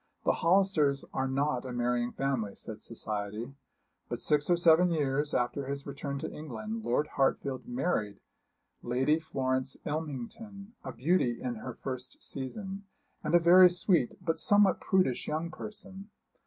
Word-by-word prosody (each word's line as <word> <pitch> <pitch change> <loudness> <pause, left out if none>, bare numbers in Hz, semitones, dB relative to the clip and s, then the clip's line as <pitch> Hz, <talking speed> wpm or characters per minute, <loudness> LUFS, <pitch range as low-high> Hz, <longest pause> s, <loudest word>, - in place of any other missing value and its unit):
The - - +5
Hollisters 165 -6 +2
are 130 0 0
not 135 -1 0
a 130 - -6
marrying 120 0 0
family, 130 -7 -2
said 110 -1 -7
society. 110 +2 -5 0.6
But - - -3
six 150 +1 +2
or 175 - +4
seven 170 +1 +5
years 145 -2 0
after 125 +3 -1
his 140 0 -4
return 140 0 -5
to - - -4
England 115 -7 -6
Lord 120 +6 +1
Hartfield 135 - 0
married 145 - -1 0.6
Lady 130 +6 +1
Florence 130 -3 -1
Ilmington, 160 - -5
a 130 - -5
beauty 125 -1 +1
in 125 - -3
her 120 +3 -7
first 130 -1 -6
season, 195 - -5 0.4
and 155 +2 +1
a - - +8
very 180 +2 +8
sweet 175 - +2
but 165 -2 0
somewhat 205 -1 +4
prudish 185 -10 +1
young 160 +2 -2
person. 195 -1 -9
140 Hz, 145 wpm, -30 LUFS, 125-175 Hz, 0.6 s, a